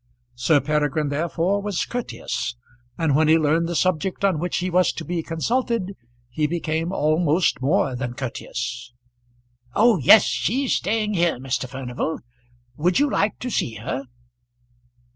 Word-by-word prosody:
Sir 130 +5 +3
Peregrine 150 +1 0
therefore 170 +6 0
was 205 -3 -2
courteous, 125 - -4 0.4
and 160 -4 +1
when 155 +1 +3
he 160 +1 +6
learned 160 +2 +1
the 175 - -3
subject 185 +3 0
on 185 -6 +2
which 180 +2 -2
he 185 - -1
was 180 0 +3
to 165 - -6
be 175 -1 -2
consulted 200 +4 -1 0.4
he 150 +4 0
became 165 +1 -2
almost 155 -1 +1
more 140 -1 +1
than 125 -1 -4
courteous. 120 -1 -5 0.8
"Oh! 225 -3 +4
yes; 195 - +8
she's 260 +3 0
staying 210 +2 0
here, 170 -5 +1
Mr. 130 0 -3
Furnival. 130 +4 -3 0.6
Would 175 +4 +2
you 290 -1 +2
like 205 +1 +1
to 250 - -3
see 115 - -1
her?" 130 +5 -4
160 Hz, 145 wpm, -23 LUFS, 140-190 Hz, 0.8 s, yes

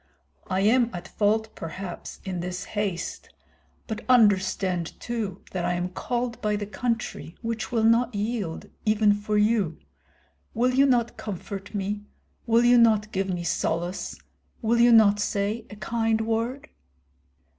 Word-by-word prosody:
I 190 0 0
am 235 +3 +4
at 175 +1 -7
fault 220 +2 0
perhaps 175 +2 -7
in 185 -2 -3
this 180 +2 -4
haste; 200 -5 -3 0.6
but 220 -1 -5
understand 190 -6 +3
too 220 -6 -4
that 180 -2 -2
I 175 0 +1
am 175 +1 -2
called 240 +5 -3
by 210 -1 +1
the 205 0 -3
country, 225 -5 -3
which 225 -1 -3
will 230 -2 +1
not 230 +1 +3
yield 205 -5 -3 0.2
even 215 -1 +4
for 210 +1 -1
you. 210 -5 +2 0.8
Will 250 +3 +2
you 275 +2 +5
not 240 -3 +1
comfort 200 0 -6
me, 205 +1 -2 0.5
will 230 +1 +4
you 245 0 +6
not 215 -2 +4
give 195 0 -1
me 175 -2 -2
solace, 170 +2 -2 0.4
will 235 +1 +1
you 240 0 +6
not 210 -3 +6
say 210 +2 -1
a 205 - -9
kind 225 +1 0
word?" 230 +4 -2
210 Hz, 145 wpm, -26 LUFS, 190-230 Hz, 0.8 s, you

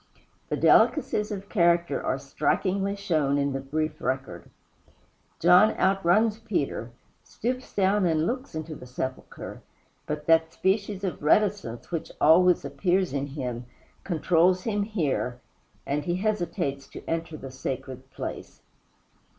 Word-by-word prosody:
The - - -1
delicacies 210 0 +3
of 200 -1 -5
character 170 -6 +2
are 130 - 0
strikingly 195 +8 0
shown 155 -8 +1
in 140 -1 0
the 135 - -2
brief 155 +3 -3
record. 130 -10 -3 0.9
John 180 +5 +6
outruns 195 +4 +3
Peter, 145 - -2 0.3
stoops 255 +3 -4
down 195 -1 +3
and 160 -1 +1
looks 255 -2 -3
into 155 0 -5
the 125 -4 -10
sepulchre; 130 +1 -6 0.5
but 150 0 -4
that 160 0 +4
species 200 0 0
of 180 -6 -3
reticence 155 - +1
which 165 -1 -3
always 175 +3 +5
appears 185 -3 0
in 140 0 -1
him 125 -4 -5 0.4
controls 180 +1 +2
him 210 -2 0
here 155 - -1 0.5
he 150 +5 -1
hesitates 175 -8 -2
to - - -11
enter 165 -1 -3
the 135 -2 -9
sacred 130 0 -6
place. - - -7
165 Hz, 125 wpm, -26 LUFS, 140-195 Hz, 0.9 s, John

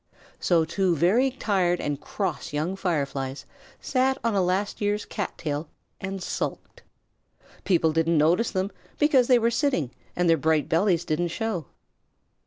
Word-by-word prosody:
So 170 -3 +3
two 180 +1 +1
very 205 - +3
tired 190 -9 0
and 145 -1 -3
cross - - -3
young 155 +6 -1
Fireflies 140 -7 -2 0.3
sat 265 0 +1
on 230 -1 +1
a 195 - +2
last 185 +4 -1
year's 205 0 0
cat 205 -4 -4
tail 150 0 -3 0.3
and 195 -1 -5
sulked. - - -4 0.8
People 165 -4 +3
didn't 165 +1 +2
notice 170 +9 +3
them 190 0 -2 0.3
because 280 -5 +4
they 250 - +6
were 230 0 +2
sitting 230 - 0 0.2
and 175 0 +1
their 165 -1 +5
bright 155 0 +1
bellies 170 +1 +2
didn't 175 +2 0
show. 195 -1 -3
180 Hz, 150 wpm, -26 LUFS, 160-210 Hz, 0.8 s, they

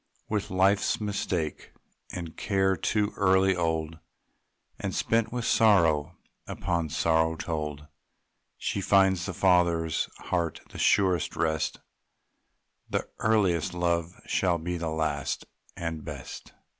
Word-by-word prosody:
With 105 -1 -2
life's 95 +2 +2
mistake 95 -6 -3 0.4
and 85 -3 -6
care 95 -2 +1
too 105 +4 0
early 95 -1 +4
old, 80 -2 -1 0.8
And - - -3
spent 115 0 +1
with 120 -1 -3
sorrow 85 -7 +3 0.3
upon 85 -3 -2
sorrow 80 +1 +2
told, 75 -3 -4 0.7
She 100 - -2
finds 95 -2 +3
the 95 - -3
father's 85 -4 +2
heart 85 -2 -2
the - - -9
surest 95 -5 +2
rest; 80 -1 -1 1.1
The - - -2
earliest 95 -7 +2
love 85 -1 -1
shall 90 -2 +1
be 90 +2 -3
the 85 -1 -3
last 80 -3 -2 0.3
and 80 -3 -4
best. - - -8
85 Hz, 115 wpm, -28 LUFS, 80-95 Hz, 1.1 s, early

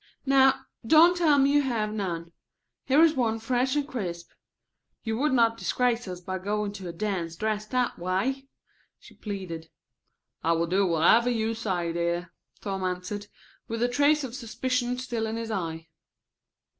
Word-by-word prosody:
"Now 270 -1 +4 0.2
don't 320 +9 +6
tell 320 -5 +4
me 275 +1 +4
you 290 - +5
have 225 -6 -1
none. 170 -5 -4 0.5
Here 285 +4 +5
is 325 -2 +5
one 230 -5 0
fresh 250 +4 0
and 290 -1 0
crisp. 175 - -5 0.7
You 225 -1 -2
would 300 +2 +2
not 230 -2 +3
disgrace 245 -2 0
us 180 -1 -6
by 185 +1 -5
going 205 +2 -2
to 195 -3 -8
a - - -4
dance 170 -3 -3
dressed 215 +2 -2
that 250 -1 0
way?" 205 +10 -1 0.5
she - - -17
pleaded. 180 -6 -6 0.7
"I 165 +1 +3
will 165 0 +1
do 190 +3 +2
whatever 175 +9 +4
you 225 -2 0
say, 185 -7 -2
dear," 170 +1 -2 0.3
Tom 195 -2 -3
answered, 185 +3 -3 0.4
with 230 +1 -2
a - - +4
trace 290 +4 +3
of 250 -3 -5
suspicion 250 0 -2
still 240 -3 -3
in 220 - -3
his 230 -1 -4
eye. 165 -5 -4
220 Hz, 165 wpm, -27 LUFS, 185-255 Hz, 0.7 s, don't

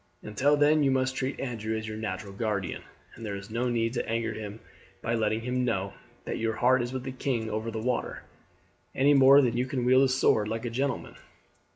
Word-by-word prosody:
Until 140 +8 +2
then 150 +1 +4
you 140 - +3
must 130 0 +1
treat 135 +1 -3
Andrew 110 -4 -3
as 110 0 -5
your 110 - -5
natural 110 -2 -5
guardian, 100 -4 -2 0.3
and 115 - -11
there 105 -2 -4
is 100 +2 -9
no 120 +2 0
need 115 -1 0
to 120 - -3
anger 115 -1 -1
him 105 0 -7 0.4
by 115 - -1
letting 110 -1 0
him 125 +2 -1
know 100 -5 -1 0.3
that - - -3
your 110 -1 -1
heart 125 +2 +3
is 120 0 -3
with 130 -1 -4
the 135 - -5
king 125 -4 -2
over 110 +2 -2
the 115 - -5
water, 125 +2 -2 0.7
any 140 +2 +4
more 140 +1 +7
than 125 - +2
that 120 - -4
you 125 - 0
can 130 -3 -2
wield 130 +1 +5
a 135 - +4
sword 120 -5 +2
like 115 +2 -3
a 120 - -3
gentleman. 135 +1 -2
120 Hz, 225 wpm, -28 LUFS, 110-130 Hz, 0.7 s, more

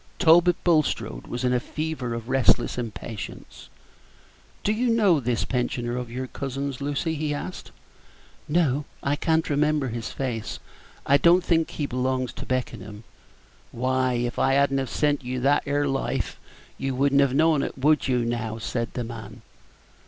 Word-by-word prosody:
Talbot 175 +2 +6
Bulstrode 155 - +1
was 120 +1 -4
in 125 0 +2
a 125 - +3
fever 150 -4 -4
of 115 0 -6
restless 130 -2 +3
impatience. 110 -2 -7 0.9
"Do 210 - +2
you 240 +3 +1
know 205 -8 +4
this 120 -3 -1
pensioner 120 -1 -1
of 125 -1 -4
your 130 +2 -4
cousin's, 135 +1 -4
Lucy?" 145 +3 -1
he 150 -1 -2
asked. 180 +5 -6 0.8
"No, 150 -3 +1 0.2
I 140 +1 +1
can't 160 +2 +1
remember 150 -2 +1
his 115 0 -4
face. 120 -5 -3 0.5
I 140 - +5
don't 175 +4 +5
think 165 -2 +2
he 150 - -3
belongs 130 -1 -1
to - - -8
Beckenham." 110 -4 -4 0.7
"Why, 130 +1 0
if 120 0 -2
I 135 - +3
had 140 0 +3
n't 135 - +2
have 135 -2 -3
sent 145 -2 +1
you 125 +1 -3
that 140 +3 +3
'ere 145 0 +1
Life, 135 -3 -2 0.4
you 135 -1 -2
would 140 +2 +2
n't 140 - +6
have 135 -2 +2
know'd, 155 -1 +3
would 150 +2 +3
you, 125 -2 +1
now?" 115 -2 -2
said 115 +1 -3
the 125 - -2
man. 110 0 -9
135 Hz, 165 wpm, -25 LUFS, 120-150 Hz, 0.9 s, Talbot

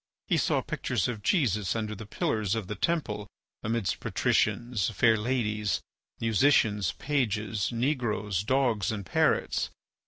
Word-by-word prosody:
He - - +3
saw - - +1
pictures - - -1
of 115 -4 -4
Jesus 105 - +1
under 110 -1 -2
the 105 0 -8
pillars 105 -1 0
of 110 -3 -3
the 105 - -4
temple 105 - -1 0.3
amidst 110 -2 -1
patricians, 120 -6 +1
fair 110 +2 +4
ladies, 105 -3 0 0.4
musicians, 110 -4 +3
pages, 110 -7 -1
negroes, 115 - 0
dogs, 120 -5 +1
and 105 -3 -4
parrots. - - +1
110 Hz, 125 wpm, -28 LUFS, 105-120 Hz, 0.4 s, fair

